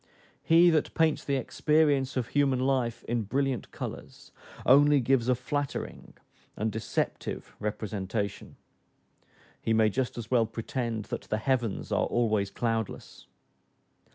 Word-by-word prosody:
He 170 +1 +6
that 155 -2 0
paints 160 -2 +2
the 140 - 0
experience 140 0 +1
of 120 -2 -2
human 140 -3 +2
life 130 -3 0
in 120 0 -1
brilliant 135 +4 -1
colors - - -8 0.3
only 145 +2 +6
gives 130 -1 +2
a 125 - +4
flattering 140 +3 -4 0.4
and 110 +1 -1
deceptive 110 - -3
representation, 105 -1 -4 1.1
he 115 - 0
may 110 -1 +4
just 125 +3 -2
as 120 0 -7
well 115 -3 +3
pretend 115 -1 -3
that - - -4
the 110 - +1
heavens 120 -2 -1
are - - +2
always 110 -4 +1
cloudless. 115 +1 -3
120 Hz, 125 wpm, -28 LUFS, 110-135 Hz, 1.1 s, He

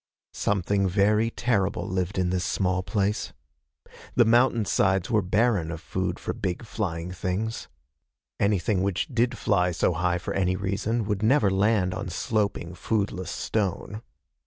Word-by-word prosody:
Something 100 0 +1
very 105 +4 +3
terrible 105 -5 0
lived 95 +1 -2
in 90 -1 +1
this 90 -1 0
small 90 -1 0
place. 100 +3 -1 0.8
The 120 - +5
mountainsides 110 -5 +2
were 110 -2 +4
barren 100 -2 +1
of 80 - -5
food - - -3
for - - -4
big 95 +4 -3
flying 90 -6 -3
things. 95 +5 -3 0.7
Anything 100 0 +1
which 95 -1 0
did 120 0 +1
fly 90 -4 +2
so 90 +1 +1
high 90 0 0
for 85 - -4
any 90 -1 +1
reason 100 +4 -1
would 105 -1 -1
never 110 -2 +4
land 95 -1 +2
on 95 +1 -4
sloping, 100 -1 -1
foodless 95 -1 -2
stone. 105 +1 -2
100 Hz, 140 wpm, -26 LUFS, 90-110 Hz, 0.8 s, The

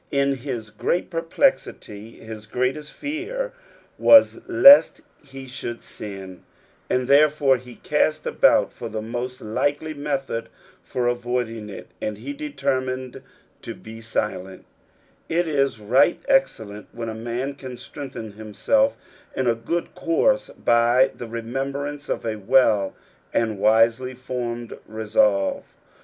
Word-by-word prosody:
Inhisgrait 140 +2 -1
perplexity 165 - -1
his 110 -1 -10
greatei>t 130 +6 -2
fear 395 +13 -4 0.5
was 285 +5 +7
lest 310 -4 +8 0.2
he 135 0 -10
should 125 -2 -6
siu; 95 -3 -8 0.5
and, 125 -1 0
therefore, 140 -1 +4
he 125 0 -13
cast 155 +1 0
ibout - - +3
for - - -7
the 110 0 -4
most 120 +3 -5
likely 145 +8 -1
metbod 135 -5 -3 0.3
for 125 -1 -3
avoiding 120 -3 -2
it, 100 - -9
and 105 - -3
he 285 - -6
deteiniined 130 - -3 0.4
to - - -7
be 110 +1 -11
silent 95 -4 -4 0.6
It 170 +1 +1
is 140 -6 0
right 120 +10 +3
excellent 110 - 0
when 115 -1 -5
a 110 - -4
man 120 +5 -4
can 130 -3 -9
strengthen 120 -5 -8
himself 110 - 0 0.4
in 130 - -1
a 120 - +3
good 115 +10 -3
course - - +1
bj 120 +3 +3
the 120 - -7
re 115 0 -5
membrance 140 +4 -4
of - - -2
a 110 -1 -2
well 105 -2 +3 0.4
and 110 -3 0
wiHeij 115 +4 +3
fonned 120 -2 -5
resolve. 105 -2 0
125 Hz, 125 wpm, -23 LUFS, 110-145 Hz, 0.6 s, lest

